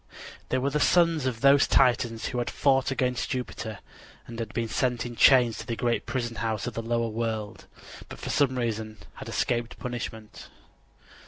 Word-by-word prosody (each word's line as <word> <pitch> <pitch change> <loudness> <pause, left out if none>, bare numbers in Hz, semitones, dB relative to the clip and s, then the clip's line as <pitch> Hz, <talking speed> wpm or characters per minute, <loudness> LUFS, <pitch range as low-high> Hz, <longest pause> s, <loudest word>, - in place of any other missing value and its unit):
They 130 - +1
were 135 +2 0
the 150 - 0
sons 165 -3 +3
of 115 -3 -3
those 140 +1 +6
Titans 120 -3 +2
who 125 - -3
had 120 - -2
fought 135 -1 +2
against 125 -3 -1
Jupiter 115 -5 -4 0.5
and 115 -2 -6
been 115 -1 -2
sent 125 +1 -1
in 120 -1 -6
chains 125 -3 +5
to 115 - -8
the 115 - -2
great 120 0 -1
prison 120 -3 -3
house 110 -2 -2
of 120 - -4
the 115 - -3
lower 115 0 -1
world, 110 -2 -4 0.4
but - - -9
for - - -5
some 130 -3 +2
reason 110 -2 -3 0.2
had - - -8
escaped 120 -1 -1
punishment. 115 -3 -7
120 Hz, 175 wpm, -27 LUFS, 115-130 Hz, 0.5 s, those